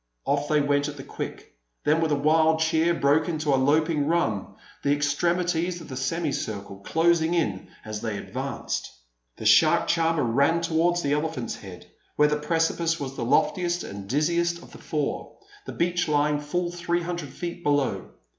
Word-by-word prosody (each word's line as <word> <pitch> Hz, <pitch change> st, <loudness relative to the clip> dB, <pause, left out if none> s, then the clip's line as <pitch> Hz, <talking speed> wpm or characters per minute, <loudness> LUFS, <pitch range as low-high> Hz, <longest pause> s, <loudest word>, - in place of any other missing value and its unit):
Off 145 Hz, +1 st, 0 dB
they 150 Hz, 0 st, +3 dB
went 145 Hz, 0 st, +1 dB
at 145 Hz, -1 st, -7 dB
the 135 Hz, -, -7 dB
quick; -, -, -7 dB, 0.3 s
then, 155 Hz, +2 st, +3 dB
with 160 Hz, -1 st, +1 dB
a -, -, +4 dB
wild 160 Hz, +2 st, +3 dB
cheer, 160 Hz, +1 st, +2 dB
broke 155 Hz, +1 st, +2 dB
into 155 Hz, -3 st, 0 dB
a -, -, +5 dB
loping 150 Hz, +1 st, +2 dB
run, 150 Hz, -, 0 dB, 0.3 s
the 140 Hz, -, +1 dB
extremities 170 Hz, +4 st, 0 dB
of 165 Hz, -, -11 dB
the 130 Hz, -, -6 dB
semicircle 130 Hz, -, -3 dB
closing 165 Hz, -, +2 dB
in 105 Hz, -, -1 dB, 0.2 s
as 110 Hz, -1 st, -5 dB
they 110 Hz, -3 st, -3 dB
advanced. -, -, -4 dB, 0.5 s
The -, -, -7 dB
shark -, -, +5 dB
charmer 165 Hz, -2 st, +2 dB
ran 140 Hz, +8 st, +2 dB
towards 170 Hz, +1 st, +1 dB
the 140 Hz, 0 st, +1 dB
Elephant's 150 Hz, -4 st, -2 dB
head, 90 Hz, -3 st, -11 dB, 0.3 s
where 150 Hz, -, +5 dB
the 150 Hz, 0 st, 0 dB
precipice 165 Hz, +1 st, 0 dB
was 135 Hz, -2 st, -5 dB
the 120 Hz, -, -3 dB
loftiest 175 Hz, -, +1 dB
and 100 Hz, 0 st, -8 dB
dizziest 170 Hz, +5 st, +1 dB
of -, -, -15 dB
the -, -, -12 dB
four, 150 Hz, -2 st, -3 dB, 0.3 s
the -, -, -5 dB
beach 175 Hz, 0 st, 0 dB
lying 150 Hz, 0 st, +2 dB
full 175 Hz, +4 st, -2 dB
three 175 Hz, 0 st, -1 dB
hundred 170 Hz, -4 st, -4 dB
feet 175 Hz, +5 st, -6 dB
below. 145 Hz, -3 st, 0 dB
155 Hz, 175 wpm, -25 LUFS, 140-170 Hz, 0.5 s, a